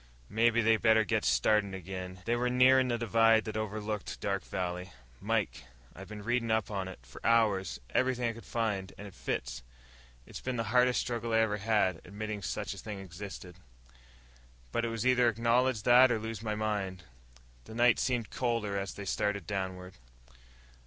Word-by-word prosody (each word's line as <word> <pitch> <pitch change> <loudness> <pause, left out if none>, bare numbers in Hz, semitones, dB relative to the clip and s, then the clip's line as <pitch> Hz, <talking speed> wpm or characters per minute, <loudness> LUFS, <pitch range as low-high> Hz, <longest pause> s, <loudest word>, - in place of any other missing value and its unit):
"Mebbe 115 +1 +3
they 110 0 +4
better 110 0 +4
get 100 - 0
started 105 -3 +2
again." 95 0 -7
They 120 - +1
were 125 +1 0
nearing 130 +1 +5
the 120 -1 0
divide 115 -1 +4
that 110 - -5
overlooked 110 -1 -4
Dark 100 -1 -2
Valley. 90 0 -4 0.3
"Mike, 65 +1 -1 0.3
I've 95 - -10
been 105 -1 -8
reading 120 +1 0
up 110 -1 +1
on 95 -2 -2
it, 95 - -8
for - - -14
hours. 110 -5 +2
Everything 125 - +1
I 115 - -1
could 115 0 -11
find. 100 -2 -2
And 100 - -8
it 100 - -10
fits. - - -4 0.6
It's - - -9
been 130 -1 -3
the 115 - -1
hardest 125 0 +4
struggle 115 -1 -3
I - - +4
ever 110 -2 +2
had 100 -5 +1
admitting 105 0 -5
such - - -3
a - - -10
thing 105 -2 -6
existed. 95 -1 -9 1.1
But 120 - 0
it - - -1
was 115 0 -3
either 125 -1 +4
acknowledge 115 +1 +1
that 125 +2 +7
or 115 - +2
lose 110 -1 -5
my 110 -2 -2
mind." 100 -4 -2 0.6
The 110 - -10
night 120 0 +4
seemed 120 -4 -1
colder 115 -5 -1
as 95 0 -5
they 100 - -7
started 105 -2 -1
downward. 95 -3 -4
110 Hz, 180 wpm, -31 LUFS, 95-115 Hz, 1.1 s, that